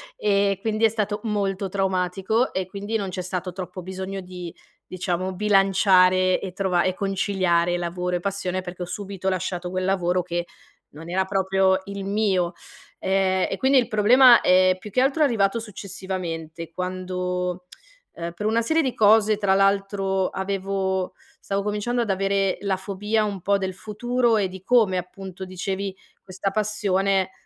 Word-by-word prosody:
e 200 - +1
quindi 220 0 +1
è - - +5
stato 210 -1 -2
molto 200 -2 -1
traumatico 190 +4 0
e 185 -1 -2
quindi 205 +3 -5
non 200 -3 -1
c'è 185 0 -4
stato 180 0 -4
troppo 185 0 -7
bisogno 190 +2 -5
di, 180 -2 -8 0.3
diciamo 185 0 -3
bilanciare 185 -2 +4
e 190 -2 -6
trova 185 -2 +1
e 185 - +1
conciliare 185 -3 +1
lavoro 180 +1 -2
e - - -6
passione, 185 -1 -2
perché 180 0 -7
ho - - -4
subito 190 +1 -4
lasciato 180 -1 -3
quel 185 0 -2
lavoro 185 -1 +1
che 175 -1 -3 0.4
non 160 +3 -11
era 190 +2 +1
proprio 190 0 +2
il 200 -1 -6
mio. 195 -4 +1 0.5
Ehm, 190 -1 +1
e - - -2
quindi 270 +1 +3
il 245 -3 +3
problema 235 +3 +7
è 185 0 +4
più 210 - -9
che 250 - +1
altro 275 +4 +1
arrivato 225 -5 +2
successivamente, 180 -6 -6
quando, 180 0 -3 0.5
ehm, 170 0 -5
per 190 +5 -6
una 230 +2 +2
serie 320 +7 +2
di 260 -4 -1
cose, 215 0 +5
tra 200 -2 +2
l'altro 195 -1 +1
avevo 190 -1 -2 0.3
stavo 200 0 -2
cominciando 210 +4 -1
ad 230 - -2
avere 195 0 +1
la 195 -2 0
fobia 205 +3 -1
un 200 -3 -4
po' 200 +3 +2
del 190 -1 -3
futuro 240 +3 0
e 200 - +1
di 185 0 -10
come 220 -5 +3
appunto 185 +1 -7
dicevi 190 +1 -4 0.3
questa 190 +1 -3
passione, 195 -2 +1
190 Hz, 160 wpm, -24 LUFS, 185-205 Hz, 0.5 s, problema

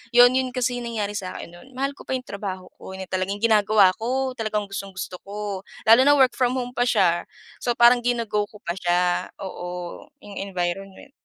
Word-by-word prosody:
Yun, 245 +1 +9
'yon 260 -1 -1
kasi 245 -1 0
nangyari 225 -4 -3
sakin 190 -4 -6
no’n. 175 +8 -15
Mahal 275 +2 -1
ko 280 - -15
pa 265 - 0
yung 255 - -4
trabaho 190 -4 -6
ko, 190 - -9
yun 190 - -6
na 185 - -12
talaga 185 0 0
yung 205 - -11
ginagawa 210 -3 +5
ko, 260 +3 -1
talagang 215 -1 -1
gustong-gusto 190 -2 -6
ko. 205 -1 -4 0.2
Lalo 225 +3 +7
na 290 - +7
work 265 -3 +5
from 250 +1 0
home 245 -1 -3
pa 245 0 0
siya. 175 -6 +2 0.3
So, 240 - -1
parang 240 +1 +6
gino-go 230 -4 0
ko 215 - -15
pa 170 - -2
siya. 175 0 +1 0.2
Oo, 180 -1 -6 0.2
yung 205 -1 -8
environment. 195 +4 -4
210 Hz, 195 wpm, -24 LUFS, 190-245 Hz, 0.3 s, Yun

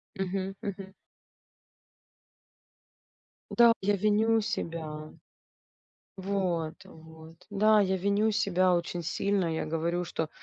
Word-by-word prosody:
Мгм, 190 0 -3
мгм. 195 -2 -6 2.6
Да, 235 -1 +7
я 205 +1 +2
виню 215 +3 +3
себя. 160 -7 -4 1.1
Вот, 185 -5 -1
вот. 160 0 -14
Да, 215 +1 +4
я 190 -2 +2
виню 200 +3 +1
себя 185 -4 +2
очень 175 0 -3
сильно, 195 +3 0
я - - -2
говорю, 165 +3 -1
что, 160 -2 -3
190 Hz, 100 wpm, -29 LUFS, 165-205 Hz, 2.6 s, Да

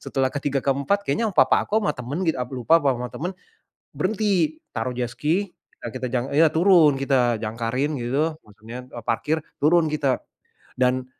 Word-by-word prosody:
setelah 135 -1 0
ke-3, 140 -1 -1
ke-4 140 +9 +1
kayaknya 215 +10 0
papa - - +4
aku, 215 - +2
sama 150 - 0
temen 135 +9 -4
gitu 160 - +2
aku 125 +1 -4
lupa, 165 +1 +6
apa 140 - +3
sama 125 0 -4
temen, 175 +5 -3 0.7
berhenti 215 - 0 0.2
taruh 125 -1 -2
jet 120 -1 -2
ski, 175 +9 -1 0.3
ya - - -4
kita 130 0 -3
jang 125 +1 -1
iya 160 +2 +6
turun, 165 -4 +5
kita 125 -5 +1
jangkarin 115 +7 -2
gitu, 150 +7 -1
maksudnya, 110 +4 -10
eee, 120 -2 -8
parkir, 145 +7 0 0.2
turun 160 +1 +4
kita, 140 -4 0 0.6
dan, 125 0 +2
140 Hz, 170 wpm, -23 LUFS, 125-160 Hz, 0.7 s, lupa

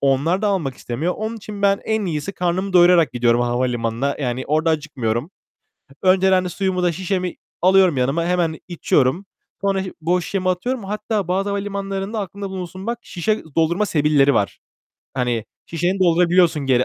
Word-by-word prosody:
onlar 145 +8 +1
da 210 - +2
almak 160 -10 -1
istemiyor. 155 +9 -3
Onun 220 +1 -4
için 205 -1 -8
ben 200 0 +3
en 220 -2 0
iyisi 160 +4 -3
karnımı 185 +2 -1
doyurarak 175 -2 +5
gidiyorum 120 0 +2
havalimanına. 120 +1 -1
Yani, 125 0 -2
orada 155 +3 +2
acıkmıyorum. 145 - -2 0.7
Önceden 185 0 +4
de - - -2
suyumu 185 0 -1
da 175 - +3
şişemi 185 +1 -2 0.3
alıyorum 185 -4 +5
yanıma, 135 +7 +1
hemen 170 -2 0
içiyorum. 165 0 +1 0.4
Sonra 195 -1 0
şı 185 - -7
boş 175 +2 +1
şişemi 185 -2 -1
atıyorum. 230 +6 -2
Hatta 210 -1 -2
bazı 195 +3 0
havalimanlarında 200 +1 -3
aklında 200 0 -5
bulunsun 185 +2 -7
bak, 235 0 -1
şişe 210 +5 -2
doldurma 170 +6 +2
sebilleri 145 -4 +3
var. 100 - 0 0.6
Hani, 120 -4 -1 0.2
şişeni 175 +4 -1
doldurabiliyorsun 170 -3 +3
geri 125 -1 +3
180 Hz, 155 wpm, -21 LUFS, 145-195 Hz, 0.7 s, doyurarak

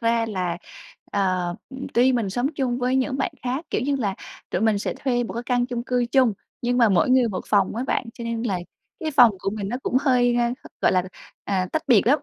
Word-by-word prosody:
ra 230 0 +2
là, 180 -5 -2 0.6
ờ, 185 -3 0 0.4
tuy 250 +2 +5
mình 225 -6 0
sống 245 +5 0
chung 255 -3 -1
với 255 +1 +1
những 265 0 0
bạn 275 - -1
khác, 255 +6 -2
kiểu - - 0
như 280 +2 0
là 205 -7 -1 0.4
tụi - - -1
mình 220 -2 +3
sẽ - - -3
thuê 245 -3 0
một - - -6
cái 235 - -3
căn 245 -1 +1
chung 245 -2 -3
cư 245 0 0
chung 255 -4 +5 0.3
nhưng 245 +1 +1
mà 230 - +6
mỗi 195 +5 +3
người 255 -2 +4
một 185 - -3
phòng 200 -1 +2
á 245 - -1
bạn, - - 0
cho 235 - -7
nên 230 0 -2
là 200 -6 -1 0.4
cái 315 -2 -2
phòng 250 -5 +7
của 195 - -2
mình 200 -1 -4
nó 245 - -2
cũng - - 0
hơi, 250 -3 +3
a, 240 0 +2 0.3
gọi - - +3
là, 185 - +3 0.4
à, 185 -2 0
tách 315 - 0
biệt 230 -4 +5
lắm. 290 +4 +5
240 Hz, 240 wpm, -24 LUFS, 205-255 Hz, 0.6 s, phòng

